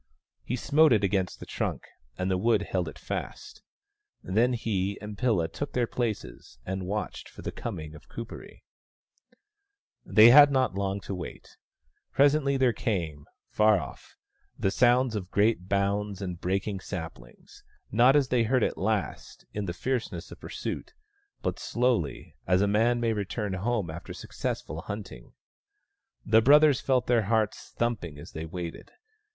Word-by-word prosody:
He 125 - -2
smote 145 +4 +4
it 105 -2 +2
against 95 -2 0
the - - -8
trunk, - - -3 0.3
and 90 +1 -1
the 95 - +2
wood 110 0 +2
held 90 -4 -2
it 75 - -12
fast. - - -6 0.6
Then 115 +7 +2
he 100 -4 -1
and 105 -1 -7
Pilla 105 -9 +1
took 145 - -6
their 125 -1 +2
places, 115 - -4
and 95 -1 -4
watched 105 +2 -4
for - - -12
the - - -3
coming 80 -9 -6
of 75 - -15
Kuperee. 115 +1 -9 1.4
They 110 +4 +7
had 145 +2 +9
not 130 -5 +1
long 100 +1 -2
to 100 - -5
wait. 90 -3 -8 0.6
Presently 140 0 +3 0.2
came, 85 - -3 0.3
far 105 -2 +4
off, 70 - -10 0.4
the 95 - 0
sound 125 +1 +3
of 95 -3 -4
great 100 -3 +1
bounds 100 0 0
and 90 -3 -5
breaking 95 +2 -1
saplings; 80 -11 -9 0.3
not, 120 +6 +5
as 140 -3 +3
they 125 -2 +3
had 110 - 0
heard 130 -3 +3
it - - -1
last, 105 -8 -2
in 105 -1 -3
the 90 - -2
fierceness 125 +7 -3
of - - -10
pursuit, - - -6 0.5
but - - -2
slowly, 120 - -1
as 90 +2 +3
a - - +2
man 115 +4 +2
may 115 -1 +1
return 105 0 -3
home 100 -2 -1
after 80 +2 -8
successful 75 +3 -4
hunting. 100 - -8 0.9
The 110 +1 +5
brothers 145 +2 +6
felt 130 -2 +1
their 120 -4 +2
hearts 110 0 0
thumping 105 -11 -2
as 75 - -11
they 80 +1 -6
waited. 85 0 -7
105 Hz, 155 wpm, -28 LUFS, 95-120 Hz, 1.4 s, had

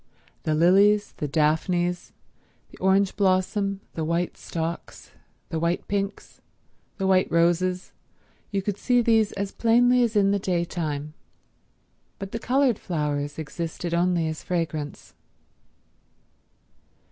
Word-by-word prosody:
The 155 - 0
lilies, 200 +6 +4
the 150 - -2
daphnes, 175 +4 0 0.6
the - - -15
orange 190 +1 +2
blossom, 195 0 +1
the 160 - -3
white 170 +2 -1
stocks, 165 0 -6 0.4
the 165 -4 -2
white 170 +2 -1
pinks, 200 0 -4 0.6
the 195 - -2
white 190 -1 +3
roses—you 180 +3 -2
could 205 0 -2
see 245 +2 +2
these 225 -2 +3
as 200 0 -3
plainly 245 +2 +4
as 235 -2 +1
in 200 -1 +4
the 200 - +1
day 180 -3 0
time; 150 -3 -4 1.0
but 195 0 -7
the 230 - -3
coloured 255 -1 +2
flowers 145 -3 -2
existed 165 +2 -5
only 170 -1 +2
as 155 -1 -4
fragrance. 160 -4 -4
180 Hz, 120 wpm, -25 LUFS, 165-200 Hz, 1.0 s, lilies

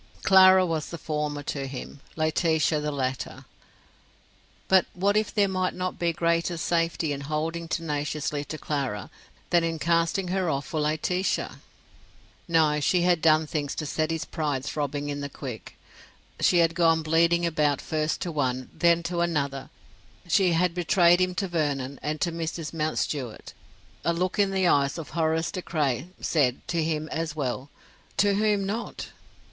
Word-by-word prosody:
Clara 190 -1 +7
was 160 -3 -2
the 170 - -6
former 150 -2 -3
to 140 -1 -3
him, 135 +1 -8 0.2
Laetitia 155 -1 +1
the 150 0 -2
latter. 130 -2 -3 1.2
But 190 -2 +4
what 200 +3 +1
if 215 0 +1
there 205 -2 +3
might 185 -1 -1
not 185 0 -3
be 170 -1 +1
greater 170 +1 0
safety 165 -1 0
in 140 - -5
holding 160 +3 -3
tenaciously 150 -2 -2
to 155 - -6
Clara 135 -11 -3 0.4
than 175 -1 +4
in 165 -1 -1
casting 170 +3 +1
her 185 -2 0
off 140 -2 -1
for 155 - -3
Laetitia? 155 +5 -1 0.9
No, 155 -3 +3
she 175 +4 +2
had 175 -2 +3
done 155 0 +4
things 145 -2 -3
to 155 - -3
set 155 +2 -1
his 165 -1 -2
pride 145 -5 -2
throbbing 145 -1 -3
in 145 0 -3
the 140 - -4
quick. 125 -5 -8 0.6
She 180 - +4
had 165 -1 +4
gone 165 -2 +3
bleeding 170 +2 +3
about 150 -4 +1
first 155 0 -2
to 175 - -2
one, 130 -4 -2
then 170 -1 +3
to 170 0 -2
another; 140 -5 -1 0.6
she 180 +1 +3
had 170 +1 +2
betrayed 175 0 +4
him 185 0 +1
to 195 +1 -1
Vernon, 140 -5 -2
and 150 +1 -3
to 170 - +1
Mrs. 165 -1 -4
Mountstuart; 150 -6 -3 0.5
a 170 - +2
look 180 +4 -1
in 200 -1 +4
the 190 -1 +1
eyes 140 -4 +3
of 165 - -7
Horace 160 +1 0
De 185 - -4
Craye 145 -4 -1
said, 130 -6 0
to 170 -2 +1
him 155 -1 -1
as 165 -1 -3
well: 135 -1 -3 0.5
to 205 0 +4
whom 205 -1 +1
not? 220 +4 -4
160 Hz, 165 wpm, -26 LUFS, 145-175 Hz, 1.2 s, Clara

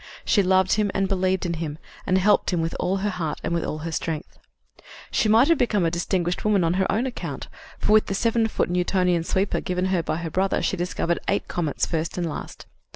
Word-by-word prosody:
She 205 - +4
loved 190 0 +3
him 210 -1 +1
and 195 - +1
believed 185 -1 0
in 170 - -1
him, 155 -2 -4 0.3
and 185 - +3
helped 200 +2 +3
him 175 - 0
with 165 0 -2
all 190 +2 0
her 205 - +1
heart 165 -5 -3
and 170 - -1
with 170 - 0
all 155 - -3
her 165 - -3
strength. 160 -1 -4 0.7
She 215 - +2
might 230 +5 +6
have 335 -3 +3
become 210 -7 +2
a 165 - +1
distinguished 175 0 -1
woman 210 -3 +3
on 165 0 +2
her 190 - +1
own 225 +5 +1
account, 255 - -5 0.3
for - - 0
with 215 0 +5
the 195 - -2
seven 230 +1 +2
foot 210 - -1
Newtonian 180 -1 +1
sweeper 190 +4 0
given 180 0 -1
her 175 - +2
by 160 - -2
her 165 -1 -5
brother 190 +3 +1
she - - +1
discovered 175 -1 -1
eight 200 - 0
comets 160 -5 -1
first 165 +1 -3
and 175 -1 -1
last. 155 - -7
185 Hz, 225 wpm, -24 LUFS, 170-200 Hz, 0.7 s, might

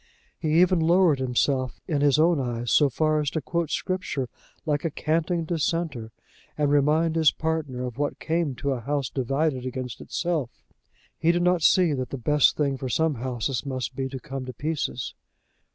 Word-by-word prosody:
He 155 +1 +2
even 180 0 +4
lowered 165 -2 +4
himself 130 0 0
in 150 -5 0
his 145 -1 +4
own 165 0 +4
eyes 120 -2 -2
so 145 -2 +5
far 155 +4 +1
as 150 -2 0
to 160 - -2
quote 170 +2 -2
Scripture 185 -9 -2 0.4
like 145 -2 0
a 165 - 0
canting 165 +3 -1
dissenter, 155 -7 -2 0.5
and 145 -1 +1
remind 155 +3 +3
his 160 -3 +5
partner 155 -6 -2
of 125 +1 -7
what 145 0 -1
came 160 -4 -1
to 140 +2 -2
a 130 - -1
house 140 +2 -2
divided 135 +1 0
against 125 -3 -5
itself. 160 -8 -3 0.6
He 165 +1 +4
did 175 0 0
not 180 -1 +3
see 175 0 +4
that 130 -2 -3
the 135 - -4
best 150 +4 +3
thing 140 -3 0
for 130 -1 -4
some 160 +5 +1
houses 125 0 -3
must 130 -3 -4
be 130 0 -2
to 130 0 -6
come 135 -1 -6
to 130 - -6
pieces. 145 -4 -3
145 Hz, 185 wpm, -25 LUFS, 130-160 Hz, 0.6 s, so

